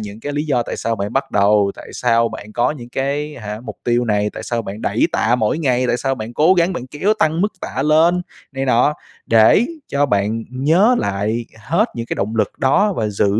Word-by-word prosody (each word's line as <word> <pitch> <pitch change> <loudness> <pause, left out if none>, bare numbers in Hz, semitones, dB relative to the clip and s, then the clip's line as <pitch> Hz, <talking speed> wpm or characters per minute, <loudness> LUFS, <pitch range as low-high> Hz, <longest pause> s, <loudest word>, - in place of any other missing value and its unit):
những 105 +1 -8
cái 145 - -4
lý 145 +1 -1
do 125 -5 +1
tại - - -5
sao 115 -1 -2
bạn 100 +1 -4
bắt 135 0 -1
đầu, 100 0 +3
tại - - -12
sao 115 -1 +2
bạn 105 +1 -9
có 120 +2 +1
những 125 -6 -8
cái 140 +4 -3
hả, 105 -1 -6
mục 110 -4 -7
tiêu 120 0 +1
này? 105 -1 0
Tại - - -8
sao 115 -1 -2
bạn 105 +2 -7
đẩy - - +1
tạ 115 +3 +2
mỗi 110 +6 0
ngày? 130 -4 +1
Tại 120 - +1
sao 135 +1 -1
bạn 110 -1 -7
cố 170 +5 +4
gắng, 175 +1 +2
bạn 130 -7 -5
kéo 185 +11 0
tăng 160 +2 +1
mức 210 +1 +1
tạ 135 - -3
lên 165 +4 +3 0.3
này 135 0 -2
nọ? 130 +3 +3 0.3
Để 115 - +5 0.2
cho 145 +1 +1
bạn 110 0 0
nhớ 160 - +3
lại 105 +4 -2
hết 170 - +1
những 115 -1 -5
cái - - -3
động 110 +3 -2
lực 110 - +1
đó, 200 +10 +3
và 110 -10 -1
giữ 100 0 0
120 Hz, 235 wpm, -19 LUFS, 110-150 Hz, 0.3 s, Để